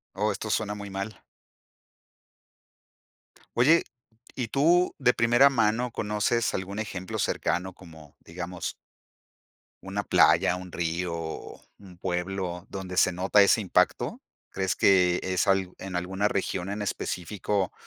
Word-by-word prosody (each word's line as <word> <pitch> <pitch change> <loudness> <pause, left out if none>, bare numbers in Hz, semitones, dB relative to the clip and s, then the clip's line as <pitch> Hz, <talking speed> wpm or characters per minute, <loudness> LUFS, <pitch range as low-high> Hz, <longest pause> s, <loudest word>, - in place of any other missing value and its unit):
Oh, 105 +2 +1
esto 110 +2 -5
suena 105 -1 0
muy 100 -1 -7
mal. 100 +2 -6 2.3
Oye, 155 +8 +5 0.5
y 125 -3 -2
tú 170 +8 +3
de 125 -2 +3
primera 120 +4 +5
mano 115 0 +1
conoces 105 +2 0
algún 95 +2 -4
ejemplo 95 -4 -5
cercano, 90 +1 -1
como 80 -5 -15
digamos 90 +1 -6 1.1
Una 100 +1 -3
playa, 90 - +4
un 90 -1 -8
río, 85 +1 -2
o 80 -1 -6 0.2
un 95 -3 -15
pueblo 90 0 -3
donde 95 -1 -6
se 95 0 +4
nota 95 +3 +3
ese 100 - +4
impacto, 95 -4 +1 0.3
¿crees 95 -1 -2
que 90 -2 +4
es 95 -1 0
al 95 -2 +1
en 95 -2 -5
alguna 95 +3 -1
región 95 -2 -2
en 105 +1 -4
específico 100 0 -2
95 Hz, 130 wpm, -27 LUFS, 90-105 Hz, 2.3 s, Oye